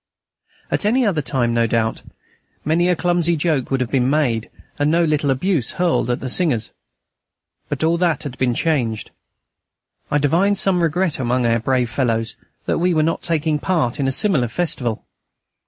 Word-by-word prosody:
At -, -, 0 dB
any 240 Hz, +5 st, +2 dB
other 180 Hz, -8 st, +1 dB
time, 120 Hz, -2 st, -1 dB
no 115 Hz, 0 st, +2 dB
doubt, 110 Hz, 0 st, -1 dB, 0.6 s
many 165 Hz, +3 st, +2 dB
a 180 Hz, -, +3 dB
clumsy 175 Hz, 0 st, +1 dB
joke 150 Hz, -5 st, 0 dB
would 135 Hz, -1 st, 0 dB
have 125 Hz, -, -2 dB
been 130 Hz, -2 st, +2 dB
made, 130 Hz, -7 st, 0 dB, 0.3 s
and 145 Hz, +1 st, +2 dB
no 170 Hz, +2 st, +3 dB
little 150 Hz, -2 st, 0 dB
abuse 135 Hz, -, 0 dB
hurled 175 Hz, -9 st, 0 dB
at 120 Hz, -, -1 dB
the 130 Hz, -, -4 dB
singers. 125 Hz, -6 st, +1 dB, 1.0 s
But -, -, -3 dB
all 165 Hz, +1 st, +2 dB
that 170 Hz, -3 st, +1 dB
has 145 Hz, -, -5 dB
been 125 Hz, -2 st, 0 dB
changed. 120 Hz, -10 st, -1 dB, 1.0 s
I 145 Hz, -, +2 dB
divined 170 Hz, +8 st, +2 dB
some 190 Hz, -2 st, +2 dB
regret 170 Hz, 0 st, 0 dB
among 125 Hz, 0 st, 0 dB
our 115 Hz, 0 st, +2 dB
brave 125 Hz, 0 st, 0 dB
fellows 115 Hz, -4 st, -1 dB, 0.3 s
that -, -, 0 dB
we 175 Hz, 0 st, +1 dB
were 155 Hz, -, +3 dB
not 165 Hz, +1 st, -1 dB
taking 160 Hz, -2 st, 0 dB
part 145 Hz, -7 st, -1 dB
in 135 Hz, -, +1 dB
a -, -, +1 dB
similar 150 Hz, -, +2 dB
festival. 120 Hz, -5 st, -2 dB
145 Hz, 175 wpm, -20 LUFS, 125-170 Hz, 1.0 s, a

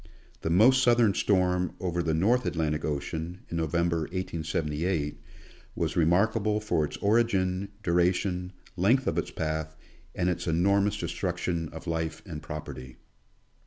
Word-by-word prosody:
The -, -, -2 dB
most 115 Hz, +10 st, +6 dB
southern 120 Hz, -4 st, +4 dB
storm 90 Hz, -3 st, +1 dB
over 85 Hz, -2 st, -1 dB
the 80 Hz, -2 st, 0 dB
North 115 Hz, +10 st, +2 dB
Atlantic 75 Hz, -2 st, -1 dB
ocean, 80 Hz, +4 st, -3 dB
in 85 Hz, -, -2 dB
November, 85 Hz, +1 st, +1 dB
1878, 80 Hz, -2 st, -2 dB, 0.5 s
was -, -, -1 dB
remarka 95 Hz, +7 st, +3 dB
ble 105 Hz, +1 st, +1 dB
for 105 Hz, -7 st, 0 dB
its -, -, -7 dB
origin, 100 Hz, -3 st, +1 dB, 0.2 s
duration, 90 Hz, +1 st, +1 dB, 0.2 s
length 115 Hz, +9 st, +3 dB
of -, -, +1 dB
its -, -, -3 dB
path, 80 Hz, 0 st, -3 dB, 0.4 s
and 90 Hz, -, 0 dB
its 90 Hz, -1 st, -1 dB
enormous 100 Hz, +5 st, +2 dB
destruction 85 Hz, -1 st, -2 dB
of 80 Hz, 0 st, -10 dB
life 80 Hz, -1 st, -3 dB
and 80 Hz, -6 st, -7 dB
property. 65 Hz, -4 st, -7 dB
85 Hz, 135 wpm, -28 LUFS, 80-100 Hz, 0.5 s, most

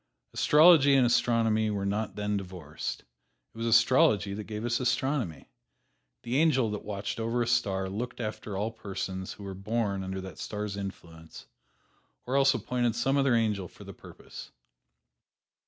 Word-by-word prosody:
Astrology 150 Hz, -3 st, +6 dB
and 130 Hz, -2 st, +5 dB
astronomy 115 Hz, -2 st, +2 dB
were 100 Hz, -2 st, -2 dB
not 105 Hz, +2 st, -2 dB
then 105 Hz, 0 st, -2 dB
divorced. 90 Hz, -6 st, -6 dB, 0.5 s
It -, -, -17 dB
was 115 Hz, -, -2 dB
astrology 115 Hz, -3 st, +4 dB
that 105 Hz, +1 st, -6 dB
gave 110 Hz, +1 st, -5 dB
us 120 Hz, 0 st, 0 dB
astronomy. 125 Hz, -, -1 dB, 0.8 s
The 120 Hz, +3 st, -1 dB
angel 135 Hz, -8 st, +3 dB
that 105 Hz, -, -5 dB
watched 100 Hz, +1 st, -5 dB
over 115 Hz, +2 st, 0 dB
a -, -, -4 dB
star 95 Hz, -5 st, 0 dB
looked 115 Hz, +7 st, -5 dB
after 105 Hz, -3 st, -5 dB
all 105 Hz, +3 st, -2 dB
persons 95 Hz, -3 st, -5 dB
who 100 Hz, -, -12 dB
were 100 Hz, -1 st, -6 dB
born 100 Hz, 0 st, -2 dB
under 95 Hz, 0 st, -4 dB
that 95 Hz, 0 st, -10 dB
star's 105 Hz, -1 st, -4 dB
influence, 85 Hz, -5 st, -9 dB, 0.8 s
or 130 Hz, -, -2 dB
else 140 Hz, -1 st, +4 dB
appointed 120 Hz, +1 st, -1 dB
some 135 Hz, +1 st, +1 dB
other 135 Hz, -3 st, +3 dB
angel 105 Hz, -5 st, 0 dB
for -, -, -15 dB
the -, -, -10 dB
purpose. -, -, -12 dB
110 Hz, 155 wpm, -28 LUFS, 100-120 Hz, 0.8 s, Astrology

